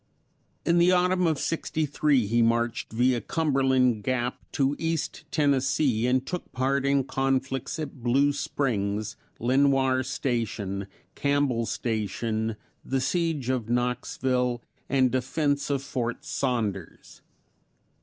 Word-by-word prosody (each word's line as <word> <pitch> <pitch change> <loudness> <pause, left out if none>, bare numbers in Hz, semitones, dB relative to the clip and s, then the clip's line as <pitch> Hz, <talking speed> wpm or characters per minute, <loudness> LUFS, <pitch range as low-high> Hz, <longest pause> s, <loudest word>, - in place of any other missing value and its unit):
In 170 0 +3
the 175 +1 +5
autumn 180 0 +3
of 160 -2 +1
'63 150 -5 0
he 115 +3 +2
marched 115 0 +1
via 120 +1 +2
Cumberland 130 -7 +2
Gap 125 +1 -1
to 140 +1 +1
East 165 -1 -2
Tennessee 135 -4 +2
and 130 +1 +1
took 180 +4 -5
part 135 +2 +1
in 140 -1 +3
conflicts 135 +2 -1
at 145 -4 -6
Blue 135 +4 +3
Springs, 110 -6 -2 0.2
Lenoir 130 +1 +3
Station, 110 -7 -2 0.3
Campbell's 140 -5 0
Station, 110 0 -2 0.3
the 135 - -1
siege 150 -1 -1
of 125 -4 -1
Knoxville, 125 0 0 0.3
and 130 -2 +3
defense 140 +3 0
of 140 -1 0
Fort 120 -3 -3
Saunders. 110 -9 -3
130 Hz, 115 wpm, -26 LUFS, 120-140 Hz, 0.3 s, the